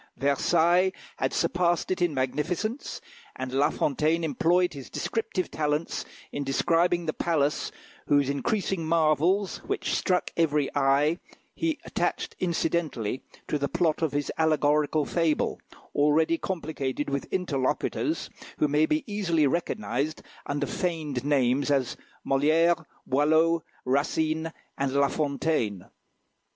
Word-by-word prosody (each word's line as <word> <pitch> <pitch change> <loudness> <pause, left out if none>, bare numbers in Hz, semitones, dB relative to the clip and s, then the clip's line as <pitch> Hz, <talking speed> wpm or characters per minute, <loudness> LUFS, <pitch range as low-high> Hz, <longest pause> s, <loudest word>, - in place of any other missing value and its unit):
Versailles 170 +6 +3 0.2
had - - 0
surpassed 175 +1 +1
it 185 - -1
in 175 -2 +3
magnificence, 155 - -2 0.3
and 130 0 -4
La 140 +3 +3
Fontaine 155 +3 +1
employed 170 +4 +2
his 135 -3 -9
descriptive 220 -5 -2
talents 150 +1 -1 0.3
in 145 - -3
describing 170 +5 +2
the 155 - -1
palace 150 -4 0 0.4
whose 145 -2 +4
increasing 185 +5 -1
marvels, 165 +4 +2
which - - -2
struck 180 -1 +1
every 150 -4 +1
eye, 145 +4 +3 0.3
he 325 -2 -1
attached - - -2
incidentally 165 - -1 0.3
to 150 - -1
the 140 - 0
plot 170 -2 +1
of 160 -3 +1
his 145 0 -1
allegorical 150 -1 +2
fable, 165 0 0 0.3
already 150 +3 +3
complicated 150 -6 -3
with 140 0 -3
interlocutors, 145 -9 -1 0.3
who 150 - +3
may 150 +2 +3
be 305 -1 +1
easily 185 -8 +1
recognised 140 -1 -1 0.2
under 145 0 -1
feigned 155 -7 -2
names 140 -1 +2
as 135 -4 +1 0.3
Molière, 160 +4 +3 0.2
Boileau, 160 +4 +3 0.2
Racine, 155 +4 0 0.3
and 135 -1 0
La 140 0 +3
Fontaine. 140 - -1
155 Hz, 120 wpm, -27 LUFS, 140-170 Hz, 0.4 s, whose